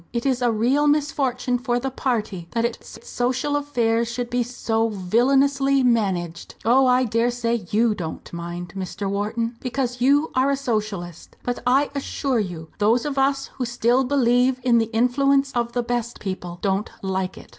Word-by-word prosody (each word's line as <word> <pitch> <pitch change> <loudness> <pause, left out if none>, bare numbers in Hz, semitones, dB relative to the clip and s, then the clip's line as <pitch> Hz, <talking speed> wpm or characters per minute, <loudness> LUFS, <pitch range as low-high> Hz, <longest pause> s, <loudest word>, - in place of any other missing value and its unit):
It 235 +1 -3
is 260 -2 +1
a 240 -1 +3
real 255 +7 +2
misfortune 275 -4 +1
for 245 -1 0
the 265 +2 -3
party 215 -9 -2
that 230 0 +1
its 235 -1 -5
social 255 +4 -1
affairs 235 -5 0
should 245 0 -4
be 245 0 +1
so 230 -2 -1
villainously 270 +7 +2
managed. 190 -8 0
Oh! 255 +3 +5
I 250 0 +4
dare 230 0 +1
say 235 -4 -2
you 225 +1 +3
don't 165 -4 -7
mind, 175 +1 -6
Mr. 195 +1 -4
Wharton, 220 +4 -2
because 250 -1 -3
you 285 +5 +3
are 260 +2 +2
a 280 - +2
Socialist. 215 - -4
But, 245 0 -2
I 275 +3 +3
assure 275 -2 -1
you, 170 -6 -5
those 225 +5 +3
of 280 -2 -1
us 275 0 +1
who 250 - 0
still 240 +2 +2
believe 250 -1 +2
in 240 -2 +4
the 225 - +2
influence 270 +4 +2
of 235 -2 -2
the 245 - 0
best 240 0 -3
people 180 -3 -5
don't 200 +2 0
like 190 -1 -2
it." - - -13
240 Hz, 175 wpm, -23 LUFS, 215-265 Hz, -, Oh